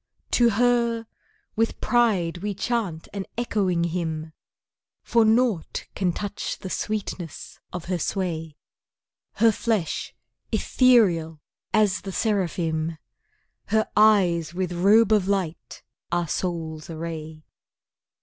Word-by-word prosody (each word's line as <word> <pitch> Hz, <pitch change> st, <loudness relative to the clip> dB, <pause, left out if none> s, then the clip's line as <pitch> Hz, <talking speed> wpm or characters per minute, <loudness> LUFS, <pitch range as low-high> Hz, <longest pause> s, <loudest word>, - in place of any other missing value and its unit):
To 240 Hz, -1 st, +5 dB
her, 235 Hz, 0 st, +2 dB, 0.5 s
with 225 Hz, +1 st, 0 dB
pride 200 Hz, -9 st, +2 dB
we 205 Hz, +1 st, -3 dB
chant 205 Hz, -6 st, -2 dB
an 195 Hz, -2 st, -4 dB
echoing 195 Hz, -7 st, 0 dB
Hymn, 160 Hz, -2 st, -3 dB, 0.7 s
For 235 Hz, -1 st, +3 dB
nought 220 Hz, -5 st, +1 dB
can 185 Hz, -2 st, 0 dB
touch 205 Hz, +3 st, -4 dB
the 190 Hz, -2 st, -7 dB
sweetness 195 Hz, -6 st, -4 dB
of 175 Hz, -1 st, -6 dB
her 180 Hz, -1 st, -1 dB
sway; 165 Hz, -4 st, -3 dB, 0.8 s
Her 230 Hz, -1 st, +4 dB
flesh 215 Hz, -5 st, -2 dB, 0.4 s
ethereal 180 Hz, -, +3 dB, 0.3 s
as 210 Hz, -4 st, +2 dB
the 195 Hz, -, -6 dB
seraphim, 165 Hz, -6 st, -1 dB, 0.7 s
Her 220 Hz, 0 st, +2 dB
eyes 180 Hz, -6 st, +4 dB
with 180 Hz, -1 st, -2 dB
robe 205 Hz, +5 st, +5 dB
of 205 Hz, -3 st, +3 dB
light 190 Hz, -5 st, -3 dB, 0.3 s
our 175 Hz, -1 st, 0 dB
souls 160 Hz, -2 st, -3 dB
array. 160 Hz, -1 st, -6 dB
185 Hz, 110 wpm, -25 LUFS, 165-220 Hz, 0.8 s, To